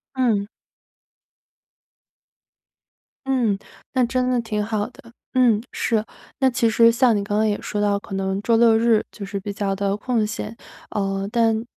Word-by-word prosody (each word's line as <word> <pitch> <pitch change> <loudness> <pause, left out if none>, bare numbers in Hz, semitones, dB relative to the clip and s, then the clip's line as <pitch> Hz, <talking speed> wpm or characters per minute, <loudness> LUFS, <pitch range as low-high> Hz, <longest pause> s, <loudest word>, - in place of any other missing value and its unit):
嗯。 230 -6 +1 2.8
嗯， 245 -7 +1 0.4
那 255 -2 +3
真 255 +1 0
的 250 - +2
挺 215 -2 -2
好 215 0 -1
的， 235 -2 -17 0.2
嗯， 240 -5 +4
是。 220 -3 0 0.4
那 265 -1 +4
其 240 -2 +1
实 230 +1 +5
像 235 0 +3
你 200 - 0
刚 205 +1 -1
刚 220 - +3
也 205 -1 0
说 210 - -3
到 205 -1 +2
可 195 - -7
能 190 0 -1
周 230 +2 +2
六 225 -1 +5
日 225 -1 +3
就 200 - -8
是 200 0 -4
比 200 +1 -5
较 200 -1 -1
地 200 0 0
空 230 -1 0
闲， 210 +1 -5 0.3
呃， 195 -2 -2
但 225 -1 +2
220 Hz, 175 characters per minute, -22 LUFS, 205-235 Hz, 2.8 s, 实